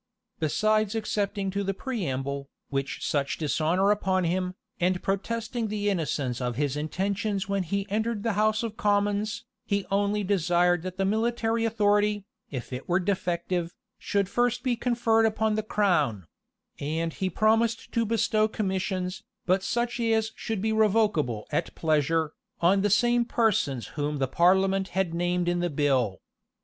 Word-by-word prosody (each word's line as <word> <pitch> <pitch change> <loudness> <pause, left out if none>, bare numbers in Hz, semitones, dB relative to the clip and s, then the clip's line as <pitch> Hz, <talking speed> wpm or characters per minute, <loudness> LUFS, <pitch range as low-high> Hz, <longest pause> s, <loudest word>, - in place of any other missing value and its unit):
Besides 215 +7 +1
excepting 205 -2 -1
to 200 +1 -1
the 195 0 -2
preamble, 140 - -3 0.2
which 135 -1 -3
such 140 -2 0
dishonor 165 +6 +2
upon 190 -3 +1
him, 180 +2 -1 0.2
and 180 +1 +1
protesting 225 +4 -2
the 205 -1 0
innocence 145 -8 -2
of 125 -1 -2
his 145 +1 0
intentions 195 +6 -2
when 200 -1 0
he 195 +3 -2
entered 220 +1 -1
the 230 - +1
house 215 +2 +2
of 220 -2 -4
commons, 205 0 0 0.2
he 200 -1 -1
only 205 +1 +1
desired 175 -2 +2
that 185 +1 -6
the 195 - +1
military 225 +2 +1
authority, 210 -2 +2 0.2
if 130 -2 -6
it 125 +6 -6
were 175 +1 +3
defective, 180 -2 -1 0.2
should 200 -1 0
first 245 +3 0
be 250 -2 +1
conferred 230 -2 +2
upon 220 0 0
the 215 - 0
crown; 165 - +1 0.5
and 160 +3 -2
he 190 - -2
promised 225 +4 +1
to 230 - +1
bestow 215 -1 +2
commissions, 190 -3 -2 0.2
but 185 +2 +2
such 240 +5 -1
as 225 -1 +1
should 220 -4 -3
be 220 0 +1
revocable 205 - +2
at 150 - -1
pleasure, 155 0 +1 0.3
on 190 +3 +4
the 205 - +2
same 240 +3 +3
persons 190 - +1
whom 150 0 -2
the 135 -1 0
parliament 190 +5 +3
had 185 -3 +1
named 175 +1 0
in 175 0 +1
the 175 0 0
bill. 135 - +1
195 Hz, 155 wpm, -27 LUFS, 170-215 Hz, 0.5 s, on